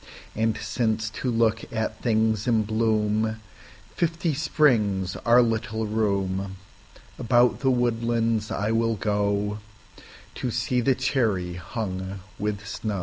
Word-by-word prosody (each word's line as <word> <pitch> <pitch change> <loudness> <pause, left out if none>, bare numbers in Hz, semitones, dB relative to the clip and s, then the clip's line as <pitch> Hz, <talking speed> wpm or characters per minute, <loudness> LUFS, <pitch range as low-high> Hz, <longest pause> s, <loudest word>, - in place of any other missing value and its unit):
And 110 0 +1
since 110 -2 -1
to 130 - -3
look 115 -1 +1
at 110 -1 -3
things 110 -1 +1
in 110 -3 +2
bloomFifty 110 - -1
springs 110 -11 +2
are 120 +1 +5
little 110 -1 -1
room, 100 -3 -1 0.6
About 120 0 +3
the 135 - +2
woodlands 115 -3 +1
I 105 +2 -1
will 115 0 +1
goTo 105 0 0 0.9
see 125 +2 0
the 130 +2 +3
cherry 110 -9 0
hung 95 +1 -5 0.2
with 105 0 -2
snow. 105 -1 -3
110 Hz, 110 wpm, -25 LUFS, 105-120 Hz, 0.9 s, are